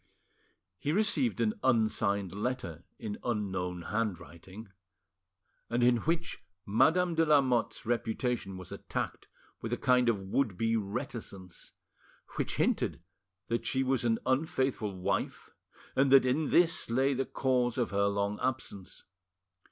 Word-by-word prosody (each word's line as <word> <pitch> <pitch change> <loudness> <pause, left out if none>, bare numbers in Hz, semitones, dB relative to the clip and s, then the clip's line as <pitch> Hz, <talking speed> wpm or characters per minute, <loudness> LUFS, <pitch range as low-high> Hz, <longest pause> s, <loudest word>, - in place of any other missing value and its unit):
He 145 - -1
received 215 - +1
an 215 - +2
unsigned 110 -6 +1
letter 100 -7 -4
in 105 -3 -5
unknown 95 -6 -2
handwriting, 95 -1 -5 1.0
and 120 +1 +1
in 120 0 +5
which 165 +7 -2 0.2
Madame 170 - +3
de 165 0 +3
Lamotte's 135 -6 +2
reputation 115 -3 -1
was 95 - -10
attacked - - -4 0.3
with 115 - -4
a 120 - 0
kind 125 -2 +3
of 110 -4 +1
would 95 +1 -1
be 115 +2 +1
reticence, 105 -4 -5 0.6
which - - -2
hinted - - 0 0.4
that 115 0 -1
she 135 0 +1
was 130 -2 +1
an 115 -1 +2
unfaithful 130 -5 0
wife 90 - -2 0.4
and 135 0 +3
that 135 -1 +7
in 140 +4 +1
this 170 -5 +3
lay 135 +4 +2
the 135 0 -1
cause 125 -3 0
of 120 - 0
her 100 0 +2
long 100 +1 -1
absence. 125 -7 -4
120 Hz, 130 wpm, -31 LUFS, 100-130 Hz, 1.0 s, that